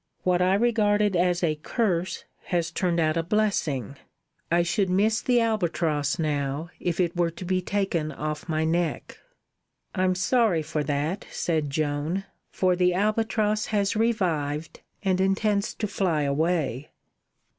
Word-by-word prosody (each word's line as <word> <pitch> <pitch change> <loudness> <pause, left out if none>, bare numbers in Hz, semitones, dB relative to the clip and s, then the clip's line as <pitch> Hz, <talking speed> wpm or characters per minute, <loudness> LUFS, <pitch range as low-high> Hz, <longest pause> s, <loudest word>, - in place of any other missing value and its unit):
What 180 -1 +2
I 185 +1 +4
regarded 210 -3 +2
as 180 0 +1
a 155 -3 +1
curse 185 -6 -1 0.2
has 170 -1 -1
turned 175 -1 0
out 155 0 +2
a - - +2
blessing. 165 - -1 0.5
I 170 +1 +3
should 180 +3 0
miss 215 +5 +2
the 245 -1 +3
albatross 170 -9 0
now 150 0 -2
if 175 0 -2
it 175 -1 +1
were 175 -1 +2
to 170 +2 -9
be 185 +1 0
taken 180 -5 -1
off 155 +2 -5
my 160 0 +1
neck." 170 +1 -1 0.7
"I'm 185 -1 +1
sorry 190 -4 +2
for 150 0 -2
that," 150 +7 -2
said 155 -4 -1
Joan, 150 +5 -1 0.3
"for 185 -1 +1
the 180 0 +2
albatross 215 +1 +1
has 205 0 0
revived 165 -9 -1 0.2
and 190 -2 +1
intends 200 +2 +1
to 215 - -2
fly 185 -7 0
away." 145 -2 0
175 Hz, 145 wpm, -26 LUFS, 155-200 Hz, 0.7 s, I